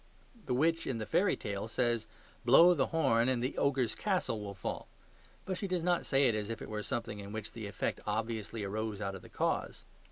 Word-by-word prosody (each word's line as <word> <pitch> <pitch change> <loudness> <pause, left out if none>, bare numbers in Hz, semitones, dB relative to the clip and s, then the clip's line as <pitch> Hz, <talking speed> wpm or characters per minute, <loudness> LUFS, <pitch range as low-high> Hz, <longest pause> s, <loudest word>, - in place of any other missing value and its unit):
The 125 - +1
witch 165 +5 +2
in 125 - -1
the 110 - -3
fairy 195 - +2
tale 100 0 -4
says, 115 -1 0 0.4
"Blow 165 +9 +8
the 140 -6 +1
horn, 130 -7 +3
and 125 -2 +1
the 130 - -1
ogre's 130 -5 +2
castle 185 - -1
will 100 -1 -6
fall"; - - -4 0.6
but 185 -1 -3
she 200 - -2
does 180 -3 -1
not 175 0 +1
say 135 0 +4
it 120 - +3
as 105 0 -2
if 115 - -4
it - - -8
were 105 -1 -3
something 115 -1 -3
in 100 0 -7
which 110 0 -5
the 110 -3 -6
effect 100 - -2
obviously 110 0 -2
arose 105 +1 -3
out 100 -2 -2
of 95 - -8
the - - -14
cause. - - -1
115 Hz, 220 wpm, -33 LUFS, 105-140 Hz, 0.6 s, Blow